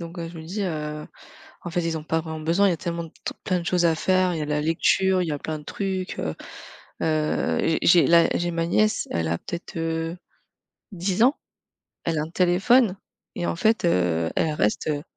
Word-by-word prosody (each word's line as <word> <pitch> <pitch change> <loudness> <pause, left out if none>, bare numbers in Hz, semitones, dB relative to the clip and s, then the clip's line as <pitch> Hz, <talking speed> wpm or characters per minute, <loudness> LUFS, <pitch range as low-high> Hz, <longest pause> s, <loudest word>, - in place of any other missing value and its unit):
Donc 170 +1 -8
heu, 165 -1 -4
je 165 0 -10
me 160 - -8
dis, 195 +5 -4
heu 150 -3 -4 0.6
en 175 - -5
fait, 175 - 0
ils 165 -1 -1
ont 155 - -8
pas 160 +1 0
vraiment 160 -1 -6
besoin. 170 +6 +3
Il 190 - +3
y - - +1
a - - -4
tellement 170 0 -4 0.4
plein 185 -1 +1
de 170 - -7
choses 175 -1 +2
à 165 -1 +3
faire. 185 +1 +2
Il - - -3
y - - -2
a 150 - -2
la 150 0 -1
lecture, 185 +4 +2
il 175 - -1
y - - -1
a 145 - -3
plein 155 +1 -4
de - - -13
trucs, 190 +1 -3
heu, 80 -1 -3 0.7
heu, 155 - 0
j'ai 165 - +1
j'ai 170 0 +6
là, 170 0 +6
j'ai 175 0 0
ma 165 0 -1
nièce. 215 +5 +1
Elle 85 -1 -1
a 85 - 0
peut-être, 170 -1 -7
heu, 165 +1 -2 0.8
10 190 +3 -1
ans? 265 +5 +4 0.7
Elle 165 -2 0
a 150 - 0
un 155 - -6
téléphone 190 +5 +3 0.4
et 175 - -2
en - - -1
fait, 220 +2 +2
heu, 85 - +1
elle 160 - +1
reste, 105 -7 0
heu 145 -1 -1
165 Hz, 230 wpm, -24 LUFS, 155-180 Hz, 0.8 s, j'ai